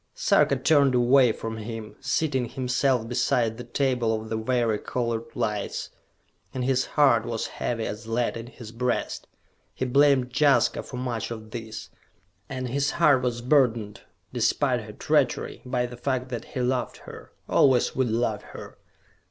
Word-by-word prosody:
Sarka - - +3
turned 140 -4 +3
away 125 0 +5
from 110 0 -5
him, 110 0 -7
seating 135 -6 0
himself 125 0 0
beside 120 -2 +1
the 125 - -6
table 120 -3 0
of 110 0 -9
the 110 - -2
vari 115 -1 0
colored 115 -2 -2
lights, 105 -2 -3 0.6
and 125 -1 -1
his 130 -1 +1
heart 130 -6 +5
was 115 -1 -3
heavy 115 -2 -3
as 110 +2 -6
lead 115 +1 0
in 115 0 -7
his 120 -3 -11
breast. 125 +1 -2 0.5
He 130 - -2
blamed 135 -1 +3
Jaska 145 +1 +3
for 125 - -9
much 120 -3 -3
of 110 -2 -8
this, 110 -1 -7 0.6
and 130 -1 -4
his 140 +3 0
heart 150 -6 +5
was 120 -2 -2
burdened, 120 -6 +2 0.3
despite - - +1
her - - -10
treachery, - - 0
by 125 -1 -1
the 120 0 -8
fact 130 0 -2
that 120 -2 -5
he 130 - -5
loved 125 0 -1
her, - - -11 0.2
always 130 -3 +3
would 130 -2 +1
love 110 -2 0
her. - - -11
125 Hz, 160 wpm, -26 LUFS, 115-130 Hz, 0.6 s, away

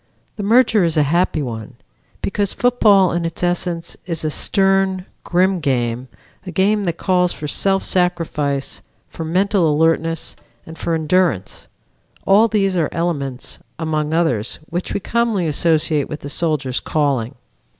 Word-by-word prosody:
The 210 - -5
merger 225 -1 +4
is 165 -2 0
a 150 - +5
happy 160 0 +1
one, 115 -4 -6 0.5
because 200 0 -1
football 210 -7 +4
in 175 0 -1
its 165 +1 -4
essence 175 -1 -1
is 165 -3 -2
a 155 - 0
stern, 195 +1 +1 0.2
grim 185 +1 +2
game, 125 -4 -1 0.4
a 190 - -8
game 200 +4 +1
that 170 -1 -2
calls 180 -1 +1
for 150 - -6
self 195 +5 +1
sacrifice, 165 -6 -1 0.3
for 165 - -6
mental 180 0 +2
alertness 165 +1 +1 0.3
and 160 - -10
for 165 0 -2
endurance; 160 - 0 0.6
all 205 +4 +5
these 195 -4 +1
are 165 -4 +1
elements, 140 -7 -3 0.2
among 155 -2 -2
others, 160 -10 0
which 175 +2 -3
we - - -1
commonly 225 -3 0
associate 155 -1 +1
with 150 - -6
the 145 - -7
soldier's 145 -5 -1
calling. 140 -5 -1
170 Hz, 145 wpm, -19 LUFS, 150-190 Hz, 0.6 s, a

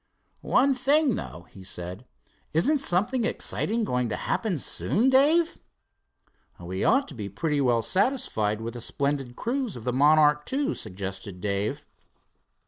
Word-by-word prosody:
"One 275 0 +3
thing, 275 +2 +2
though," 85 - -6
he 95 - -12
said; 90 +5 -7 0.5
"isn't 280 - +3
something 235 +2 +1
exciting 225 0 0
going 125 - -1
to - - -2
happen 210 -7 -1
soon, 230 - +1
Dave?" 310 +6 +3 1.0
"We 90 +2 -4
ought 275 +1 +3
to - - -9
be 105 -5 -6
pretty 145 - -1
well 120 -3 +2
satisfied 115 - 0
with 115 0 -5
the 120 - -6
splendid 140 -1 -2
cruise 245 - -2
of 120 - -8
the 125 - -1
Monarch 150 +2 +4
II," 285 +3 0
suggested 95 0 -6
Dave. 100 +1 -2
150 Hz, 140 wpm, -26 LUFS, -, 1.0 s, Monarch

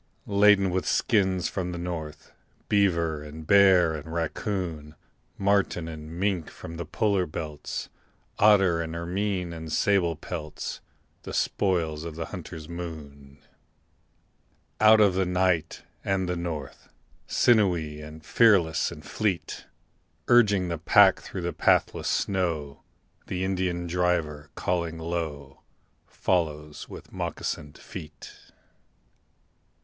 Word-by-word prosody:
Laden 100 -2 +4
with 90 +1 -1
skins 95 -7 +2
from 90 -2 -3
the 90 - -5
north, 80 -3 -6 0.4
Beaver 85 -7 +2
and 75 +1 -9
bear 95 -3 +6
and 80 +1 -7
raccoon, 85 -2 -3 0.4
Marten 100 -4 +1
and 80 -1 -8
mink 95 -5 0
from 80 +1 -9
the 85 -2 -5
polar 100 +1 +1
belts, 75 -1 -5 0.5
Otter 95 -5 +5
and 80 0 -5
ermine 90 +1 -2
and 80 -1 -7
sable 85 -1 +2
pelts 75 -1 -6 0.4
The - - -8
spoils 80 -6 0
of 85 -2 -6
the 80 0 -4
hunter's 85 -4 -7
moon. 75 -5 -9 1.4
Out 110 0 +7
of 100 -3 +5
the 95 +1 +1
night 90 -3 0 0.2
and 95 -1 0
the 90 - -1
north, 85 -4 -6 0.4
Sinewy, 90 -10 +2 0.2
fearless 95 -9 +3
and - - -10
fleet, 95 -7 -2 0.6
Urging 105 -6 +4
the 85 -2 -3
pack 80 - +6
through - - -7
the - - -2
pathless - - +2
snow, 80 -7 -1 0.5
The 90 0 -2
Indian 90 -2 -1
driver, 85 -4 -1
calling 85 -2 -1
low, 80 -4 -5 0.5
Follows 75 -4 -2
with - - -11
moccasined 75 -1 -4
feet. 75 - -10
85 Hz, 115 wpm, -26 LUFS, 80-95 Hz, 1.4 s, Out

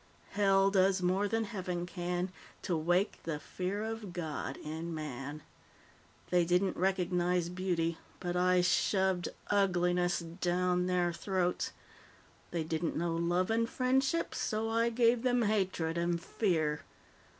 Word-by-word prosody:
'Hell 195 -1 +4
does 190 -1 +3
more 190 +3 +2
than 225 +2 0
Heaven 180 -5 -3
can 175 +1 -3 0.3
to 180 - 0
wake 175 +5 +1
the 165 -2 -3
fear 185 +6 -3
of 220 -4 -5
God 155 -5 -4
in 160 +2 -5
man.' 145 0 -6 0.9
They 180 -1 +4
didn't 180 +3 +2
recognize 180 -1 +1
beauty, 175 -3 -1 0.2
but 175 -1 -3
I 180 0 +4
shoved 190 0 +2 0.2
ugliness 180 -3 +2
down 180 +1 0
their 180 -1 +1
throats; 180 -1 -1 0.8
they 170 -2 -2
didn't 160 +1 -2
know 165 0 0
love 175 +4 +1
and 230 +1 +1
friendship, 265 +5 +1
so 220 +1 -1
I 230 +1 +2
gave 235 0 +3
them 245 -1 +2
hatred 185 -6 0
and 170 0 0
fear. 160 -6 0
180 Hz, 130 wpm, -32 LUFS, 170-195 Hz, 0.9 s, Hell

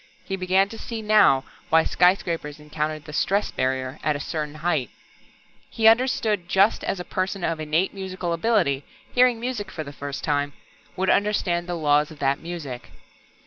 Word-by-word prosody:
He 195 - -2
began 190 +1 +2
to 225 - -9
see 225 -2 -5
now 210 -11 +5 0.3
why 160 0 +5
skyscrapers 170 -5 +1
encountered 150 0 -4
the 150 - -9
"stress 200 +6 +1
barrier" 130 0 -2
at 150 - +1
a - - -3
certain 150 0 -4
height. 155 -6 -1 0.8
He 220 -1 +2
understood 225 -3 +3
it 175 - -25
just 195 +4 +3
as 195 - -2
a 180 - -5
person 185 0 -2
of 165 -1 -1
innate 155 +4 0
musical 185 -3 -4
ability, 165 -8 +1 0.3
hearing 245 -2 +4
music 230 -5 -3
for 160 - -5
the 140 -1 -9
first 140 0 -6
time, 145 -1 0 0.4
would 190 +1 +1
understand 185 -4 +1
the 175 - -2
laws 150 -1 +2
of 155 - -12
that 135 0 +1
music. 155 -8 -7
170 Hz, 175 wpm, -24 LUFS, 150-195 Hz, 0.8 s, now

